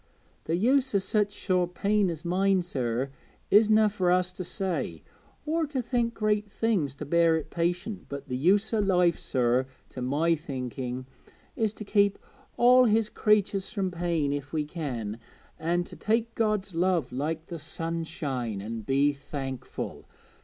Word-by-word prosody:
Th' 160 - -1
use 260 +5 +2
o' - - +7
such 205 +1 +1
sore 185 -3 0
pain 200 +3 +1
as 165 0 -6
mine, 190 +1 +2
sir, 130 -5 -2 0.4
isna 215 +1 +6
fur 195 -3 0
us 180 0 +2
to 185 - -5
say, 170 - -3 0.4
or 320 +1 0
to 280 -2 -2
think 235 -1 0
great 210 -1 0
things 200 -11 0
to 150 - -6
bear 165 +2 +4
it 160 - -6
patient; 180 +4 -2
but 140 0 -6
the 125 - -3
use 200 - +2
o' 220 - +2
life, 180 -4 +3
sir, 125 +1 +1 0.2
to 130 - -7
my 145 +7 +2
thinking, 130 -4 -4 0.5
is 220 -2 +1
to 215 - -8
keep 200 -1 +3 0.4
all 250 +1 +7
His 220 -1 +3
creatures 205 -2 +2
from 195 -3 -1
pain 170 -4 0
if 145 0 -5
we 155 -2 -1
can, 125 -9 -4 0.4
an' 170 +2 +1
to - - -11
take 230 +2 0
God's 215 -4 0
love 170 -5 +1
like 155 +5 -2
the 170 -2 -7
sunshine, 150 -8 -3
an' 110 +3 -5
be 140 +5 +2
thankful. 140 -2 -6
175 Hz, 160 wpm, -28 LUFS, 140-210 Hz, 0.5 s, o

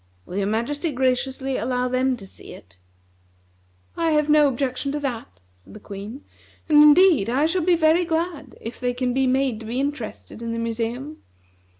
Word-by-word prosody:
Will 180 - -7
your 200 -1 0
Majesty 285 - -1
graciously 260 +1 -1
allow 250 0 -1
them 255 0 0
to 195 - -11
see 190 - -12
it?" 90 -1 -16 1.2
"I 330 -1 0
have 300 0 +2
no 300 -1 +6
objection 270 +1 -2
to 295 - -2
that," 235 - -5 0.2
said - - -15
the - - -9
Queen; 210 +7 -9 0.4
"and 300 -2 +6
indeed 300 - +6
I 270 +5 +2
shall 355 +3 0
be 350 +1 +3
very 325 +2 +3
glad 325 -4 -3
if 230 - -8
they 245 -1 -1
can 250 -1 -1
be 265 0 +1
made 260 -3 +1
to 225 - -10
be 240 +3 -2
interested 275 -5 -5
in 230 0 -4
the - - -3
museum. 230 +6 -4
260 Hz, 185 wpm, -23 LUFS, 235-295 Hz, 1.2 s, no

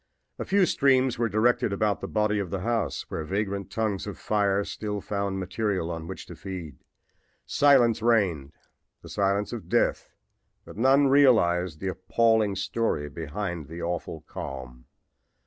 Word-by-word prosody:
A - - -3
few 195 -1 +3
streams 130 -6 +2
were 115 -1 +1
directed 110 +1 +2
about 100 +1 0
the - - -4
body 105 -1 +1
of 95 -3 -3
the 95 +1 -3
house, 110 -8 -1
where 80 - -3
vagrant 100 +3 -3
tongues 105 -3 -2
of 105 - -6
flame 100 -1 +1
still 105 -1 -4
found 100 -1 -3
material 95 -2 -2
on 80 -1 -6
which - - -7
to - - -10
feed. 90 -8 -7 0.7
Silence 125 -6 +4
reigned 95 -12 +1 0.5
the - - -11
silence 100 0 0
of - - -7
death, - - +1 0.6
but - - -11
none 135 +6 +4
realized 90 - +4
the 95 - -2
appalling 105 +2 +2
story 95 -6 -1
behind 85 0 -5
the 85 +2 -7
awful 85 -2 -4
calm. 65 -4 -8
100 Hz, 150 wpm, -26 LUFS, 85-110 Hz, 0.7 s, Silence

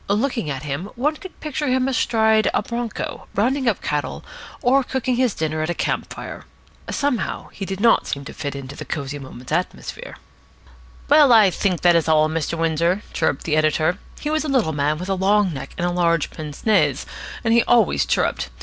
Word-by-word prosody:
Looking 225 - 0
at 135 0 -4
him, 150 +7 -4
one 290 +6 0
could 375 +2 -11
picture 300 -1 -3
him 255 0 +2
astride 220 -4 +2
of 205 - 0
a - - -16
bronco, 235 -1 -4
rounding 255 +6 +1
up 220 - +1
cattle, 150 -1 -3 0.4
or 265 +2 +4
cooking 255 -1 -1
his 250 -4 +1
dinner 155 0 -2
at 155 - -2
a 175 - -1
camp - - -2
fire. - - -8 0.4
Somehow 280 -5 -1
he 195 - -6
did 190 0 -5
not 230 +2 +4
seem 140 0 -4
to - - -8
fit 145 -2 -5
into 140 0 -7
the - - -7
Cosy 145 -1 -4
Moments 130 -1 -10
atmosphere. 185 - -3 0.9
"Well, 290 -2 +6
I 215 -5 +7
think 185 -2 -1
that 175 - +5
that - - +3
is 165 -1 +2
all, 155 -1 +4
Mr. 165 +1 -2
Windsor," 165 +4 +1
chirruped 135 - 0
the 155 - 0
editor. 155 +4 +2 0.2
He 300 - -3
was 310 0 +1
a 305 - -3
little 245 -12 +2
man 145 +1 0
with 180 +3 -6
a 195 - +1
long 195 0 +2
neck 135 - -7
and 175 0 -1
large 170 -3 +1
pince 150 -2 -8
nez, 220 -2 +3 0.4
and 225 -1 +2
he 235 - +6
always 240 -2 +3
chirruped. - - 0
190 Hz, 205 wpm, -22 LUFS, 155-245 Hz, 0.9 s, I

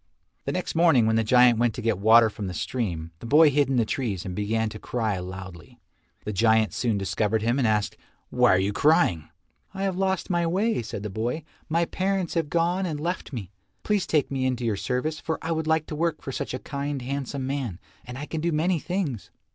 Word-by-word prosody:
The - - -1
next - - -3
morning 160 -8 +4
when 110 0 +2
the 115 - +2
giant 125 +1 +5
went 120 -2 +2
to - - -5
get 110 -4 +1
water 110 +2 +6
from 100 -1 -5
the 90 - -5
stream, 85 - -3
the 115 - -8
boy 150 +4 +6
hid 140 0 +2
in 135 - +1
the 120 -2 +3
trees 105 -6 -3
and 90 - -4
began 110 +3 0
to 110 - -9
cry 110 -6 -2
loudly. 90 -2 -9 0.5
The 105 - -3
giant 110 +1 +3
soon 115 -4 0
discovered 105 +2 0
him 120 +4 +1
and 125 - +2
asked, 105 -1 0 0.3
"Why - - +4
are - - +3
you 95 +2 0
crying?" 100 - +3 0.5
"I 195 - -3
have 190 -2 0
lost 190 0 0
my 170 -1 +1
way," 200 - +1
said 105 -2 -6
the 105 - -4
boy, 120 +10 -2 0.3
"my 170 +2 +2
parents 190 -1 -1
have 165 -3 -1
gone 175 +3 +1
and 155 -3 -3
left 175 +3 -3
me. 105 -9 -6 0.3
Please 210 -3 0
take 150 -3 +1
me 135 -1 -1
into 125 -2 -2
your 110 -3 +1
service, 130 +9 -2
for 160 - -3
I 165 - -4
would 160 -1 -1
like 160 -1 +2
to 150 - -6
work 165 0 -1
for 135 - -4
such 130 - -4
a - - -2
kind 140 0 -4
handsome 135 0 -3
man, 130 -9 -3 0.3
and 125 0 -8
I 145 - -5
can 160 0 -4
do 170 +1 0
many 165 +3 +1
things." 170 - -3
130 Hz, 225 wpm, -25 LUFS, 110-160 Hz, 0.5 s, water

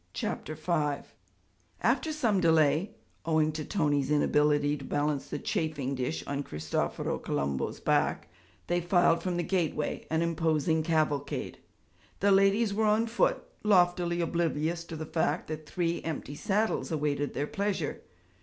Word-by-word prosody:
CHAPTER 155 - -3
V 155 -3 -1 0.8
After 255 +7 +2
some 230 -11 +1
delay 160 +2 +3 0.3
owing 155 -1 +2
to 155 0 -4
Tony's 145 -6 0
inability 150 0 +3
to 140 - -10
balance 145 0 -1
the - - -4
chafing 155 -11 -2
dish 130 +4 -2
on 140 0 -2
Cristoforo 75 - -2
Colombo's 70 -1 -2
back - - +1 0.4
they 175 0 0
filed 175 -1 +3
from 180 0 -2
the 175 - 0
gateway, 165 -5 -1
an 160 +1 +1
imposing 160 -1 +1
cavalcade. 155 -3 -1 0.6
The 200 +1 +3
ladies 195 +2 +4
were 220 +2 +1
on 215 +2 +3
foot, 230 +1 +1 0.2
loftily 175 -3 +3
oblivious 170 0 -1
to 165 - -7
the 155 0 -5
fact 160 +1 -1
that 155 -1 -6
three 170 -1 -1
empty 155 -3 -5
saddles 210 +5 0
awaited 145 -2 -1
their 145 - 0
pleasure. 195 -3 -2
160 Hz, 140 wpm, -29 LUFS, 150-180 Hz, 0.8 s, ladies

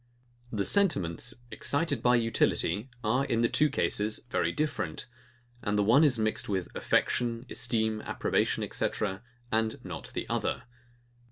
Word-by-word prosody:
The 100 -3 -1
sentiments, 165 - +2 0.2
excited 165 +4 0
by 125 0 +4
utility, 115 -2 +1
are, 125 +5 +2
in 115 -4 0
the 115 - +4
two 150 +5 +3
cases, 105 -5 0
very - - +1
different; 155 0 -2 0.6
and 105 0 -1
the 105 - +3
one 120 +9 +5
is 140 -5 +4
mixed 110 -1 -1
with 95 -3 -3
affection, 120 0 0
esteem, 110 -2 0
approbation, - - 0
&c., - - +2 0.6
and 110 0 0
not - - -6
the - - -3
other. - - -1
115 Hz, 140 wpm, -29 LUFS, 105-130 Hz, 0.6 s, one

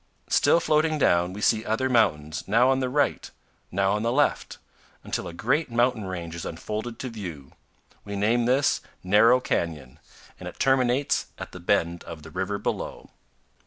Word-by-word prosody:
Still - - +4
floating 155 0 +2
down, 90 -9 +2
we 100 +3 -7
see 110 0 +2
other 115 +4 0
mountains, 85 - +1
now 120 +6 +4
on 135 - +1
the 130 -1 -1
right, 145 +3 0 0.4
now 95 +1 +1
on 105 +1 0
the 115 +1 0
left, 145 +3 0 0.5
until - - -3
a - - -6
great 130 - 0
mountain 120 -2 +1
range 85 -3 -5
is 85 - -6
unfolded 110 +7 -5
to 130 - -5
view. 85 - -8 0.5
We 100 0 -6
name 115 +4 +2
this 130 +4 +2 0.2
Narrow 105 +6 +5
Canyon, 75 - -3 0.4
and - - -6
it - - -14
terminates 135 0 +2
at - - -8
the - - -9
bend 85 +1 0
of 80 -2 -9
the 80 - -11
river 95 +3 -2
below. - - -5
110 Hz, 170 wpm, -25 LUFS, 85-125 Hz, 0.5 s, Narrow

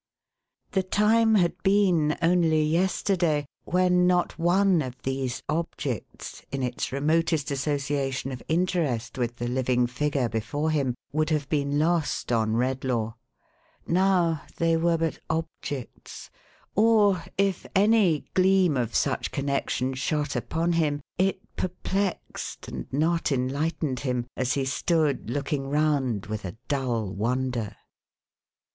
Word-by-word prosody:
The 190 - +2
time 220 +4 +3
had 175 -4 +2
been, 185 -6 +3
only 165 -2 +3
yesterday, 170 -1 +1 0.2
when 180 0 +3
not 180 -1 +1
one 180 +1 +3
of 130 -2 -6
these 130 -1 -2
objects, 150 - -4
in 135 -1 -2
its 125 -1 -2
remotest 155 +2 +1
association 140 -1 -1
of 125 -2 -6
interest 160 -9 0
with 120 -1 -1
the 120 0 -4
living 125 0 +1
figure 135 +1 0
before 120 +8 -2
him, 135 -5 0 0.2
would 155 +1 0
have 150 -3 0
been 145 -1 0
lost 160 -3 0
on 110 -2 +1
Redlaw. 125 -2 -1 0.7
Now, 175 -3 +2 0.2
they 165 0 +2
were 165 +1 +2
but 165 -1 -2
objects; 160 -5 -5 0.4
or, 205 -4 +4
if 195 -2 0
any 200 -6 +4
gleam 185 -5 +4
of 120 -2 -2
such - - 0
connexion 140 -2 -1
shot 145 +3 -1
upon 165 +2 -1
him, 150 -3 +1 0.2
it 190 0 +1
perplexed, 190 +1 -3
and - - -7
not 160 +4 +1
enlightened 135 +1 -1
him, 125 -3 -1
as 130 0 0
he 135 -1 0
stood 150 -1 0
looking 135 +1 -2
round 140 -8 +1
with 110 0 -5
a 95 +3 -6
dull 120 -8 -1
wonder. 120 +1 -1
150 Hz, 125 wpm, -26 LUFS, 130-175 Hz, 0.7 s, or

